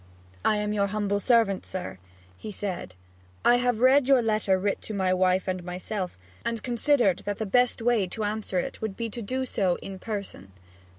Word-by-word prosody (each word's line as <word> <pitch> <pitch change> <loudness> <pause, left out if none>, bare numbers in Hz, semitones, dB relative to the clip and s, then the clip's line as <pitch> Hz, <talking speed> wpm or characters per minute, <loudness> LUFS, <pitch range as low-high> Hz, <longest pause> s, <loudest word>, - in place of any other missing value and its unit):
'I 215 - +3
am 210 0 -1
your 200 -1 +1
humble 205 0 -1
servant, 225 -4 +3
sir,' 180 - -6 0.4
he 215 - -8
said. 185 - -5 0.5
'I 245 - +6
have 245 -2 +1
read 260 +1 +5
your 270 -3 +5
letter 215 -3 +2
writ 200 +1 -1
to 215 - -6
my 190 -2 +2
wife 185 0 +2
and 185 -1 -2
myself, 180 - -4 0.3
and 230 -1 -3
considered 240 -5 +2
that 205 -1 -4
the 220 - -2
best 245 +3 +2
way 230 -5 +2
to 215 +4 -4
answer 210 -2 -2
it 180 - -3
would 220 -3 -4
be 230 -1 -3
to 235 - -6
do 260 +5 -2
so 190 -7 +1
in 190 -1 -8
person.' 200 - -6
205 Hz, 190 wpm, -27 LUFS, 190-230 Hz, 0.5 s, I